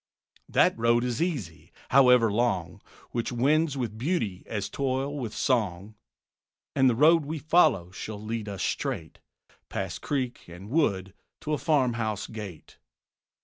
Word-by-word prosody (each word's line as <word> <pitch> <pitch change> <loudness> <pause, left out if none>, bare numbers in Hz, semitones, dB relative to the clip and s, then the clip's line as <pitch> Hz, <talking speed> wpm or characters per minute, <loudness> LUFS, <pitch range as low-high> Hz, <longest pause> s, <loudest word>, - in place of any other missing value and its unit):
That - - +4
road 115 +1 +3
is 125 +1 -2
easy, 130 - -3 0.2
however 125 -4 +6
long, 100 -6 -1 0.3
Which 120 0 -2
wends 145 +4 +2
with 110 -4 -4
beauty 120 - -1
as 105 -3 -3
toil 135 +1 -2
with 125 -7 -4
song; 105 -6 -1 0.8
And 130 -1 +5
the 120 - +1
road 160 +5 +5
we 155 +3 -4
follow 145 - +3
shall 105 +2 -6
lead 110 0 -4
us 100 -2 -4
straight 80 -1 -3 0.5
Past - - -4
creek 130 -4 -3
and 90 +5 -10
wood 95 - +1 0.3
to 155 - -2
a 150 - 0
farmhouse 120 - 0
gate. 105 -8 -9
120 Hz, 140 wpm, -27 LUFS, 100-140 Hz, 0.8 s, however